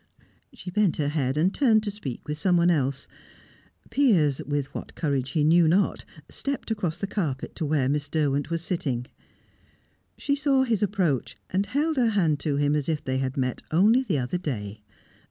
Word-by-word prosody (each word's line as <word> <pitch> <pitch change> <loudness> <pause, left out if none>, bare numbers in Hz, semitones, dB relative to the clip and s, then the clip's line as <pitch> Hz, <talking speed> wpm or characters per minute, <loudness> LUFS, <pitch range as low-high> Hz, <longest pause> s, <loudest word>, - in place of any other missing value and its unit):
She 210 -9 -9
bent 205 -2 +2
her 145 -2 0
head 140 -2 -1
and 180 +6 +2
turned 225 -6 +3
to 210 - -2
speak 155 - -7
with 150 0 -4
someone 175 0 +3
else. 140 -3 -1 0.8
Piers, 175 - +3
with 145 -1 -2
what - - -7
courage 140 -5 -1
he 155 -3 +2
knew 165 +2 +5
not, 185 +5 +1 0.2
stepped 275 -4 -4
across 180 -7 -2
the 200 - -2
carpet 160 -10 -3
to 160 - -2
where 145 -3 +1
Miss 145 +1 -1
Derwent 145 -2 0
was 165 0 -2
sitting. 135 -9 -2 1.1
She 280 - 0
saw 280 -2 +2
his 230 -6 0
approach, 185 - 0
and 195 +2 0
held 300 +3 0
her 240 -3 +3
hand 170 -9 +1
to 145 -2 -1
him 145 +1 +2
as 150 0 -1
if 155 -2 -1
they 130 0 -1
had 135 0 -3
met 130 -2 -1
only 210 +10 +4
the 195 - -1
other 130 +7 -2
day. 110 - -5
160 Hz, 185 wpm, -26 LUFS, 140-205 Hz, 1.1 s, knew